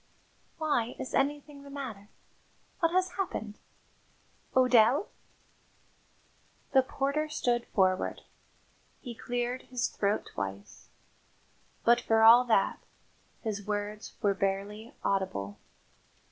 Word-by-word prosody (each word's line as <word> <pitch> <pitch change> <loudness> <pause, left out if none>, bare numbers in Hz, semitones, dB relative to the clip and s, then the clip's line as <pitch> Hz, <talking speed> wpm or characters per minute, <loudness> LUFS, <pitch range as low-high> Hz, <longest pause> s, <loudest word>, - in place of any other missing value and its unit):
"Why, 290 -7 0
is 255 - -6
anything 290 +1 -1
the 280 - -12
matter? 235 -8 -7 0.7
What 330 -1 +2
has 370 +1 0
happened? 220 - -3 1.0
O'Dell?" 255 - +5 1.6
The 265 - +6
porter 280 +4 -1
stood 240 -5 0
forward. 185 -2 +1 0.8
He 245 -4 -7
cleared 245 +2 -3
his 250 -1 -1
throat 205 +1 0
twice, 100 +1 -6 1.0
but 240 +1 +5
for 225 -2 +3
all 235 +2 +9
that, 220 -5 +2 0.6
his 205 -3 -4
words 210 0 -4
were 200 -1 +4
barely 200 +3 -3
audible. 100 - -1
235 Hz, 100 wpm, -30 LUFS, 205-270 Hz, 1.6 s, all